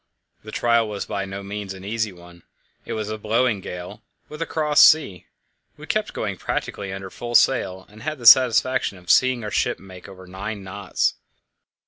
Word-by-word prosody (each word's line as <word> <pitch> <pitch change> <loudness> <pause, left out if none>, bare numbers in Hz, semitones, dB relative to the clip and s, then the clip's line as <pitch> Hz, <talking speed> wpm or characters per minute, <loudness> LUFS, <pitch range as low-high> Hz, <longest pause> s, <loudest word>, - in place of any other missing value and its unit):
The 110 - -9
trial 115 0 +2
was 105 -1 -4
by 100 -2 -3
no 100 +1 -7
means 100 -1 -6
an 95 0 -11
easy 110 0 -2
one. 85 -1 -16 0.4
It - - -5
was 110 -1 -3
blowing 110 +1 +1
a - - -13
gale, 90 0 -8 0.3
with 150 +1 -9
a 165 - -2
cross 150 -2 +2
sea; 125 - +4 0.5
we - - -11
kept - - -1
going - - -3
practically 100 -1 -4
under 95 -1 -7
full 120 0 -6
sail, 95 -9 +2
and 105 +1 -16
had 155 +5 -4
the 120 - -11
satisfaction 130 -3 +5
of 90 -1 -1
seeing 130 -2 +3
our 105 - -5
ship - - 0
make 95 -1 -13
over 95 -1 -12
nine 100 +3 -6
knots. 95 +1 -2
105 Hz, 185 wpm, -23 LUFS, 95-120 Hz, 0.5 s, satisfaction